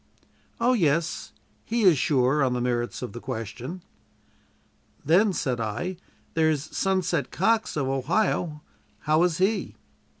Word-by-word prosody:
"Oh, 240 Hz, +2 st, +3 dB
yes; 165 Hz, -, 0 dB, 0.3 s
he 230 Hz, 0 st, -1 dB
is 180 Hz, -5 st, +7 dB
sure 135 Hz, +1 st, +2 dB
on 130 Hz, -2 st, +1 dB
the 125 Hz, -, -1 dB
merits 120 Hz, 0 st, -2 dB
of 125 Hz, -, -6 dB
the 120 Hz, -, -6 dB
question." 125 Hz, -, -6 dB, 1.2 s
"Then," 190 Hz, +8 st, +4 dB
said 130 Hz, -8 st, -2 dB
I, 145 Hz, -, -3 dB, 0.4 s
"there's 155 Hz, -2 st, 0 dB
'Sunset' 185 Hz, -5 st, 0 dB
Cox, 220 Hz, 0 st, +1 dB
of 140 Hz, -3 st, 0 dB
Ohio. 150 Hz, -, 0 dB, 0.4 s
How 155 Hz, +1 st, +2 dB
is 175 Hz, -2 st, +2 dB
he?" 195 Hz, +4 st, 0 dB
155 Hz, 130 wpm, -26 LUFS, 130-185 Hz, 1.2 s, is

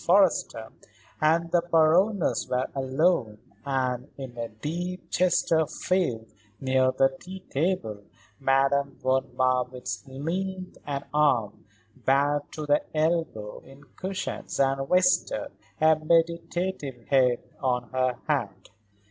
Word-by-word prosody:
Forrester 175 Hz, -, +2 dB, 0.5 s
and 165 Hz, +2 st, +2 dB
the 175 Hz, -, +4 dB
Baroness 170 Hz, +5 st, +3 dB
were 125 Hz, 0 st, +1 dB
alone 135 Hz, -4 st, +1 dB, 0.3 s
and, 130 Hz, -1 st, -1 dB
in 130 Hz, -3 st, -8 dB
a 115 Hz, -1 st, -4 dB
deep 175 Hz, +11 st, -5 dB
Chesterfield 170 Hz, -6 st, +1 dB, 0.3 s
near 130 Hz, -1 st, +2 dB
the 135 Hz, 0 st, +2 dB
tea 190 Hz, +1 st, -9 dB
table, 140 Hz, -, -1 dB, 0.4 s
Madame 135 Hz, +1 st, +2 dB
von 130 Hz, 0 st, +1 dB
Marwitz 125 Hz, 0 st, -1 dB
leaned 180 Hz, +7 st, -4 dB
an 140 Hz, -1 st, -3 dB
arm, 135 Hz, -11 st, +1 dB, 0.4 s
bared 145 Hz, +2 st, +2 dB
to 155 Hz, -, -5 dB
the 145 Hz, 0 st, +3 dB, 0.2 s
elbow, 155 Hz, -10 st, -1 dB
in 135 Hz, +1 st, -16 dB
cushions 190 Hz, +1 st, -4 dB
and 135 Hz, 0 st, +1 dB
rested 180 Hz, 0 st, +2 dB, 0.3 s
a 155 Hz, 0 st, +5 dB
meditative 165 Hz, -4 st, 0 dB
head 125 Hz, -3 st, +4 dB, 0.2 s
on 125 Hz, -3 st, 0 dB
her 130 Hz, -1 st, +1 dB
hand. -, -, -2 dB
140 Hz, 110 wpm, -26 LUFS, 130-170 Hz, 0.5 s, a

